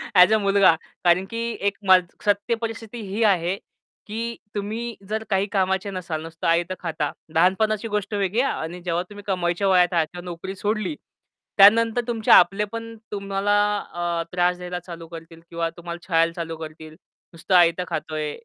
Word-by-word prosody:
As 180 +3 +7
a - - +5
मुलगा, 200 -4 +4 0.3
कारण 180 +1 +4
की 230 - -5 0.3
एक 200 - -1 0.5
सत्य 205 +3 +1
परिस्थिती 225 0 -5
ही 210 +4 -1
आहे, 185 -3 +2 0.5
की 230 +2 -4 0.2
तुम्ही 220 +3 -4
जर 220 +1 -2
काही 195 -1 +2
कामाचे 190 0 0
नसाल, 170 -4 -4
नुसतं 165 0 -5
आयतं 170 +2 +2
खाता, 160 -4 -2 0.2
लहानपणाची 200 +6 +2
गोष्ट 210 -1 -3
वेगळी 200 +3 +1
आहे 275 - +1
आणि 170 +3 -6
जेव्हा 175 0 0
तुम्ही 205 0 -11
कमायच्या 180 0 0
वयात 180 -1 +4
आहात, 170 +1 -1
नोकरी 180 +2 -6
सोडली. 210 +6 -2 0.6
त्यानंतर 225 +4 +6
तुमचे 225 -2 0
आपले 195 +4 +6
पण 230 0 -6 0.2
तुम्हाला 200 0 0 0.4
अ, 170 -1 -1
त्रास 180 0 +1
द्यायला 180 0 -5
चालू 170 -1 -10
करतील 165 0 -11
किंवा 165 -1 -2
तुम्हाला 170 0 -8
छळायला 165 -2 +3
चालू 165 -1 -5
करतील. 155 0 -9 0.4
"नुसतं 170 +3 -1
आयतं 175 0 +5
खातोय, 155 -1 -3
185 Hz, 160 wpm, -23 LUFS, 170-210 Hz, 0.6 s, As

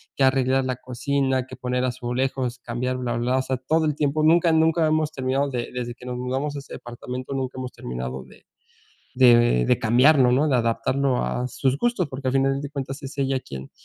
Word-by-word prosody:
que 135 - +1
arreglar 130 0 +3
la 130 -1 -1
cocina, 130 +1 -1
que - - -9
poner 125 0 -2
azulejos, 125 0 -2
cambiar 125 +2 -3
bla, 125 -2 -2
bla, 120 +2 -1
bla. 130 - +3
O - - +2
sea, 130 0 -2
todo 155 +5 +1
el 150 - 0
tiempo. 150 +1 0
Nunca 165 +1 +4
nunca 160 0 +3
hemos 155 0 +1
terminado 135 0 -1
de 120 -2 -3
desde 120 -1 -4
que 125 - -14
nos 125 -1 -4
mudamos 135 +4 -2
a - - -4
este 140 - -10
departamento, 125 +2 -7
nunca 130 -1 -3
hemos 130 -1 -5
terminado 65 +1 -6
de - - -19 0.7
de 125 -2 +8
de 120 - +3
de - - +2
cambiarlo, 125 +3 +5
¿no?, 135 +5 +3
de 130 - +3
adaptarlo 125 +3 0
a 125 +1 -2
sus 135 +3 -1
gustos, 235 -7 0
porque 130 0 -4
al 130 - -1
final 135 0 +2
de 145 - -5
cuentas 135 0 -6
es 140 +1 -8
ella 135 -1 0
quien 65 - -9
130 Hz, 215 wpm, -24 LUFS, 125-140 Hz, 0.7 s, de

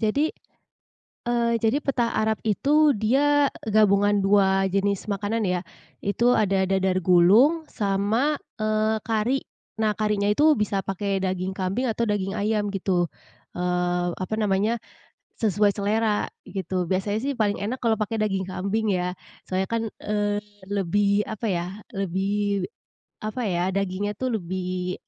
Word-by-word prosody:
jadi, 250 +8 +2 1.0
eee, 235 -1 +1
jadi 225 +5 +2
petah 240 -4 0
Arab 220 0 +1
itu, 290 +6 +3
dia 280 +6 +3 0.2
gabungan 205 -1 +4
dua 195 -1 +4
jenis 200 +1 0
makanan 205 +3 -1
ya. 180 -2 +1 0.4
Itu 235 +5 +2
ada 195 -4 +2
dadar 190 -2 +1
gulung, 220 - +5
sama, 215 +9 0 0.2
eee, 215 0 +1
kari. 230 +4 0 0.4
Nah, 215 -1 +3
karinya 210 -1 +1
itu 300 +7 +4
bisa 210 -2 0
pakai 195 0 -1
daging 185 0 -1
kambing 195 +8 -1
atau 225 +1 -1
daging 205 -1 -1
ayam 205 0 0
gitu. 185 -3 0 0.5
Eee, 180 0 0
apa 190 +4 -3
namanya, 210 +3 +1 0.6
sesuai 205 -1 +3
selera, 210 +1 0 0.2
gitu. 185 -1 -3
Biasanya 195 +4 0
sih 280 +3 -2
paling 210 -4 +1
enak 225 +6 -3
kalau 225 -3 +2
pakai 215 +1 -1
daging 195 -3 0
kambing 200 +3 -1
ya, 180 0 -1 0.3
soalnya 190 +1 -1
kan, 230 -1 -1 0.2
eee, 205 0 0 0.3
lebih 200 +1 +1
apa 220 +1 -4
ya 175 -1 -1 0.3
lebih 195 +1 -1 0.6
apa 215 +4 -3
ya, 175 -2 0
dagingnya 195 +1 -1
tuh 255 +6 -2
lebih, 180 0 -3
205 Hz, 135 wpm, -25 LUFS, 190-220 Hz, 1.0 s, gulung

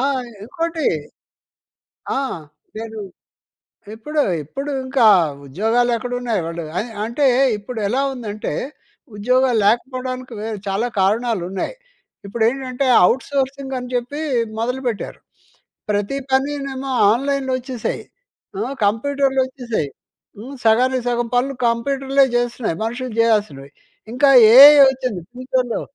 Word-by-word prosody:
ఆ! - - 0 0.4
ఇంకోటి 330 +3 -3 1.3
ఆ! - - +1 0.6
నేను 225 0 -7 1.0
ఇప్పుడు, 300 +7 -3 0.2
ఇప్పుడు 275 - -6 0.2
ఇంకా 260 -3 +3 0.4
ఉద్యోగాలు 225 - +1
ఎక్కడున్నాయి. 245 -2 -2
వాళ్ళు 170 0 -5 0.2
ఆహ్, 230 +1 -6
అంటే 265 +5 0 0.3
ఇప్పుడు 225 +3 -7
ఎలా 255 +6 0
ఉందంటే 215 - -5 0.6
ఉద్యోగాలు 250 +3 +2
లేకపోడానికి 255 +2 -1
వే 220 - -4 0.2
చాలా 205 +5 -1
కారణాలున్నాయి. 195 - -1 0.5
ఇప్పుడేంటంటే 250 +5 -1 0.2
ఔట్‌సోర్సింగ్ 270 +1 -2
అని 250 0 -7
చెప్పి 245 +5 -3 0.4
మొదలుపెట్టారు. 245 -1 -3 0.7
ప్రతీ 205 +7 -1
పనీనేమో 275 0 -1 0.2
ఆన్‍లైన్‍లో 270 +2 0
వచ్చేసాయి. 250 -2 -4 0.6
అహ్, 245 +7 -3
కంప్యూటర్లొచ్చేశాయి. 260 - -1 0.5
హ్మ్, 250 +7 -9
సగానికి 250 +3 +3
సగం 240 0 0
పనులు 260 +3 +1
కంప్యూటర్లే 270 +3 +1
జేస్తున్నాయి, 240 -6 -1
మనుషులు 245 +3 -4
జేయాల్సినవి. 210 -12 +1 0.4
ఇంకా 265 +3 +3 0.3
ఏఐ 280 +3 +11 0.2
వచ్చింది 255 -7 -4
ఫ్యూచర్‌లో. 255 -1 -2
245 Hz, 100 wpm, -20 LUFS, 225-270 Hz, 1.3 s, ఏఐ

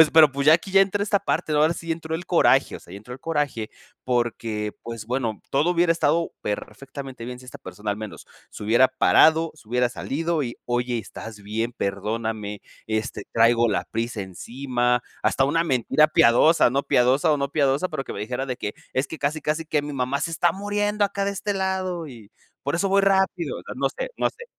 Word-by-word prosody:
es 160 - +7
pero 160 -2 +7
pues, 140 +1 -3
ya 155 - +9
aquí 170 +4 -2
ya 195 0 +6
entró 195 +1 +2
a - - +1
esta 205 -1 +2
parte, 175 -5 -1
¿no? 150 - +3
Ahora 155 +2 +3
sí 165 0 -7
entró 160 0 -5
el 175 +3 -5
coraje, 140 -6 +3
o - - -13
sea, 85 - -15
ya - - -7
entró 115 +4 -11
el 130 - -13
coraje 145 -9 -2 0.3
porque, 115 -4 -1
pues 115 -2 -7
bueno, 120 -4 -2
todo 145 +6 +2
hubiera 175 -1 +2
estado 165 0 +1
perfectamente 135 +3 -6
bien 125 +1 -6
si 130 - -14
esta 125 - -10
persona 105 0 -6
al 100 - -2
menos 110 -2 -8 0.2
se - - -10
hubiera 120 +5 +4
parado, 160 +4 +4
se 115 -8 -20
hubiera 125 +1 +2
salido 160 +6 -2
y: 120 -3 -5
"Oye, 120 0 -1
¿estás 110 -1 -9
bien? 110 +4 -2
Perdóname, 105 0 -3 0.3
este, 110 +3 -3
traigo 115 +1 +4
la - - 0
prisa 115 -1 -3
encima". 125 +5 -1 0.2
Hasta 135 - +2
una 165 +5 +2
mentira 150 +1 +3
piadosa, 140 +3 +5
no 135 +3 0
piadosa 130 +6 +3
o - - +2
no 140 -1 -2
piadosa, 140 +3 +1
pero 155 -5 -4
que - - -6
me - - -6
dijera 125 +5 -3
de 125 -2 -3
que: 105 - -5 0.2
"Es 130 +2 0
que 160 - -7
casi, 150 +2 -1
casi 155 +2 -1
que 155 -1 0
mi 145 0 -5
mamá 135 +1 -1
se 170 - -2
está 170 +2 +2
muriendo 205 +2 0
acá 200 0 -1
de 200 - -1
este 200 +1 -3
lado 185 -3 -2
y 115 -6 -12 0.3
por 140 - -1
eso 195 +3 +1
voy 195 +1 +3
rápido", 195 - +1
o - - -10
sea, - - -7
no - - +1
sé, - - -5
no - - +2
sé. 475 - -12
135 Hz, 220 wpm, -24 LUFS, 120-165 Hz, 0.3 s, ya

